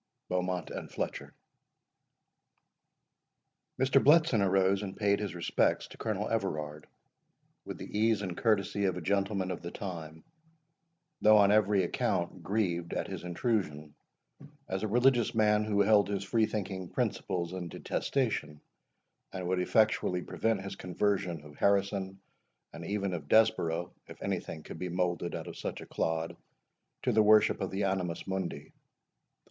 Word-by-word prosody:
BEAUMONT 90 Hz, -2 st, -2 dB
AND -, -, -6 dB
FLETCHER. -, -, -5 dB, 2.4 s
Mr. 130 Hz, +1 st, +4 dB
Bletson 150 Hz, -6 st, +5 dB
arose 95 Hz, 0 st, +3 dB
and 95 Hz, -2 st, -6 dB
paid 100 Hz, -1 st, +2 dB
his 100 Hz, -5 st, -4 dB
respects 85 Hz, -, +1 dB
to -, -, -13 dB
Colonel 105 Hz, -2 st, -2 dB
Everard, 75 Hz, -8 st, -3 dB, 0.8 s
with -, -, -6 dB
the -, -, -8 dB
ease 110 Hz, -1 st, +2 dB
and 90 Hz, -3 st, -4 dB
courtesy 100 Hz, -2 st, +1 dB
of 95 Hz, -2 st, 0 dB
a -, -, -4 dB
gentleman 100 Hz, +1 st, 0 dB
of 90 Hz, -, -5 dB
the 85 Hz, -, -5 dB
time; 80 Hz, -5 st, -7 dB, 1.0 s
though 110 Hz, 0 st, +7 dB
on 100 Hz, -1 st, +6 dB
every 105 Hz, -2 st, +4 dB
account 85 Hz, +1 st, -1 dB
grieved 85 Hz, -3 st, -1 dB
at -, -, -2 dB
his -, -, -6 dB
intrusion, 85 Hz, -, -2 dB, 0.7 s
as 95 Hz, 0 st, -3 dB
a 110 Hz, -, -1 dB
religious 120 Hz, +1 st, +3 dB
man 105 Hz, -1 st, +3 dB
who 105 Hz, -1 st, +2 dB
held 100 Hz, 0 st, +4 dB
his 100 Hz, -1 st, -2 dB
free 110 Hz, +3 st, +2 dB
thinking 95 Hz, -4 st, -4 dB
principles 85 Hz, -1 st, -2 dB
in 90 Hz, -2 st, -4 dB
detestation, 110 Hz, -, -2 dB, 0.7 s
and 95 Hz, -2 st, -4 dB
would 90 Hz, 0 st, +1 dB
effectually 90 Hz, -2 st, +2 dB
prevent 110 Hz, -4 st, -1 dB
his 100 Hz, 0 st, -6 dB
conversion 90 Hz, -3 st, -1 dB
of 75 Hz, -1 st, -14 dB
Harrison, 100 Hz, -1 st, +1 dB, 0.5 s
and -, -, -8 dB
even 100 Hz, -2 st, -1 dB
of 80 Hz, -5 st, -5 dB
Desborough, 90 Hz, -6 st, +3 dB, 0.2 s
if -, -, -12 dB
any -, -, 0 dB
thing 80 Hz, -, -8 dB
could -, -, -9 dB
be 90 Hz, -, -3 dB
moulded 90 Hz, -1 st, -1 dB
out -, -, -5 dB
of -, -, -8 dB
such -, -, -4 dB
a -, -, -8 dB
clod, 80 Hz, 0 st, -2 dB, 0.7 s
to -, -, +2 dB
the 110 Hz, -, +4 dB
worship 105 Hz, 0 st, +5 dB
of 95 Hz, -, -1 dB
the 95 Hz, +2 st, -2 dB
Animus 95 Hz, -3 st, -1 dB
Mundi. 95 Hz, -6 st, -4 dB
95 Hz, 150 wpm, -31 LUFS, 90-105 Hz, 2.4 s, though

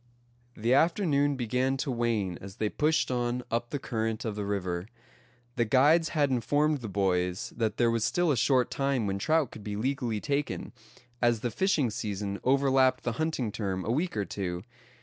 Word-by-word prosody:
The 115 Hz, +3 st, +1 dB
afternoon 145 Hz, -2 st, +3 dB
began 125 Hz, +2 st, 0 dB
to 135 Hz, -, -2 dB
wane 115 Hz, -7 st, -1 dB
as 95 Hz, 0 st, -9 dB
they 105 Hz, -, -1 dB
pushed 155 Hz, +1 st, +1 dB
on 120 Hz, 0 st, -1 dB
up 120 Hz, +1 st, -1 dB
the 145 Hz, -, -2 dB
current 115 Hz, -2 st, -3 dB
of 110 Hz, -2 st, -2 dB
the 105 Hz, -1 st, -3 dB
river. 90 Hz, -2 st, -2 dB, 0.7 s
The 120 Hz, -, +3 dB
guides 150 Hz, +8 st, +4 dB
had 145 Hz, -4 st, +1 dB
informed 145 Hz, +5 st, +1 dB
the 115 Hz, -4 st, -6 dB
boys 90 Hz, -2 st, 0 dB
that 110 Hz, -2 st, -1 dB
there 120 Hz, -1 st, +3 dB
was 115 Hz, -2 st, 0 dB
still 175 Hz, +6 st, +2 dB
a -, -, +2 dB
short 125 Hz, +1 st, +2 dB
time 135 Hz, -4 st, 0 dB
when 100 Hz, 0 st, -2 dB
trout 155 Hz, +2 st, +1 dB
could 110 Hz, -, -10 dB
be 105 Hz, -1 st, -4 dB
legally 120 Hz, -1 st, -1 dB
taken, 145 Hz, +2 st, -2 dB, 0.5 s
as 120 Hz, -2 st, +2 dB
the 120 Hz, -, -2 dB
fishing 150 Hz, -, +1 dB
season 100 Hz, -1 st, -3 dB
overlapped 135 Hz, 0 st, +3 dB
the 120 Hz, -, 0 dB
hunting 150 Hz, -8 st, -1 dB
term 95 Hz, -3 st, -3 dB
a 115 Hz, -, 0 dB
week 155 Hz, +1 st, -1 dB
or 100 Hz, -, 0 dB
two. 90 Hz, -3 st, -4 dB
120 Hz, 185 wpm, -29 LUFS, 105-140 Hz, 0.7 s, guides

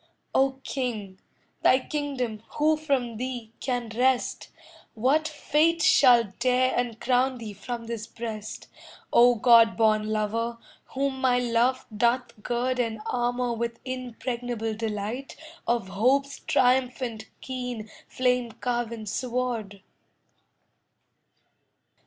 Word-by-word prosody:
O 270 Hz, 0 st, +3 dB
king, 215 Hz, -8 st, -4 dB, 0.4 s
thy 255 Hz, -, +6 dB
kingdom 260 Hz, -6 st, -3 dB
who 310 Hz, +1 st, +3 dB
from 270 Hz, -7 st, -1 dB
thee 245 Hz, -2 st, -5 dB
can 245 Hz, -3 st, -2 dB
wrest? 255 Hz, +1 st, +1 dB, 0.5 s
What 275 Hz, +8 st, +2 dB
fate 315 Hz, +2 st, +1 dB
shall 260 Hz, -7 st, +6 dB, 0.2 s
dare 255 Hz, +1 st, +2 dB
uncrown 245 Hz, +2 st, +1 dB
thee 220 Hz, -3 st, -7 dB
from 235 Hz, +4 st, -6 dB
this 230 Hz, -1 st, -5 dB
breast, 220 Hz, -3 st, -6 dB, 0.5 s
O 245 Hz, +1 st, +7 dB
god 230 Hz, 0 st, +6 dB
born 215 Hz, -1 st, +3 dB
lover, 220 Hz, +2 st, -1 dB, 0.4 s
whom 270 Hz, -1 st, -1 dB
my 255 Hz, -1 st, +3 dB
love 245 Hz, +1 st, +1 dB
doth 235 Hz, 0 st, 0 dB
gird 250 Hz, +3 st, -1 dB
And 225 Hz, -2 st, -1 dB
armour 245 Hz, 0 st, 0 dB
with 235 Hz, 0 st, -3 dB
impregnable 245 Hz, -3 st, -4 dB
delight 220 Hz, +4 st, -4 dB, 0.3 s
Of 235 Hz, -5 st, 0 dB
Hope's 265 Hz, +8 st, +1 dB
triumphant 250 Hz, -3 st, +1 dB
keen 250 Hz, -4 st, -5 dB, 0.2 s
flame 250 Hz, -2 st, 0 dB
carven 235 Hz, -2 st, -3 dB
sword? 230 Hz, -4 st, -3 dB
245 Hz, 105 wpm, -26 LUFS, 225-255 Hz, 0.5 s, O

